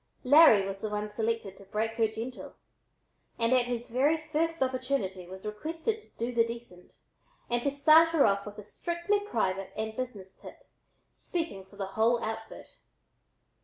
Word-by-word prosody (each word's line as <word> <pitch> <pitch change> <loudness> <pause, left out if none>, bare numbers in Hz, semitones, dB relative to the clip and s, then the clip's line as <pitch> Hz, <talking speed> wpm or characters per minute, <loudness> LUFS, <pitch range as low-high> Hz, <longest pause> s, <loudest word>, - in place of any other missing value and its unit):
Larry 255 -8 +7
was 195 0 -6
the 215 - -2
one 210 0 -3
selected 220 -3 -2
to - - -13
"break 215 +3 -1
her 225 -1 +3
gentle," 225 +4 -7 0.8
and 230 +2 +2
at 250 -1 +4
his 240 -1 -3
very 275 +7 +2
first 320 0 -1
opportunity 255 -9 -2
was 190 +2 -10
requested 325 - -3
to - - -22
"do 235 +2 -2
the 235 -1 +4
decent" 230 -6 -9 0.6
and 240 0 +2
to 280 - +1
start 310 +4 +6
her 325 -4 +4
off 200 0 +1
with 210 - -9
a 210 - -8
strictly 345 - -1
private 195 - -2
and 220 0 -3
business 210 -7 -6
tip, - - -14 0.4
speaking 325 - -4
for 190 - -19
the 200 -1 -3
whole 220 +5 +2
outfit. 220 0 -7
230 Hz, 165 wpm, -29 LUFS, 210-280 Hz, 0.8 s, Larry